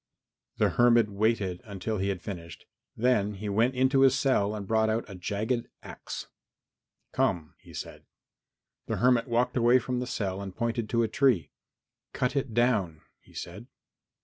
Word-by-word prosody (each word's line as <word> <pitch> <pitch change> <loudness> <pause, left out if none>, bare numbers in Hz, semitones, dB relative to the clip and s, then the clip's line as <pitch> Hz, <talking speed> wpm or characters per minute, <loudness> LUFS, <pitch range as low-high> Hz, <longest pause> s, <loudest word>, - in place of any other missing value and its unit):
The - - +3
hermit 120 -3 +4
waited 100 -3 0
until 100 +1 -4
he 100 +1 0
had 95 -2 -3
finished, 85 -5 -8 0.3
then 105 -4 +2
he 105 +2 -5
went 115 +6 +2
into 130 +2 +3
his 135 -1 +5
cell 110 -7 +1
and 105 -2 -5
brought 110 +1 +2
out 110 +1 0
a 100 - -9
jagged 105 +6 -2 0.2
axe. - - -7 0.9
"Come," 80 -3 0
he - - -16
said. - - -8 0.8
The - - -2
hermit 125 0 +3
walked 120 +1 +1
away 120 +1 +5
from 125 0 -2
the 125 - -3
cell 100 -6 -3
and 95 -2 -7
pointed 115 -2 -2
to 115 -1 +2
a - - +1
tree. 125 - +2 0.6
"Cut 125 +2 -1
it 135 -5 -2
down," 105 -10 +1 0.2
he - - -22
said. 100 +8 -7
110 Hz, 165 wpm, -28 LUFS, 100-125 Hz, 0.9 s, his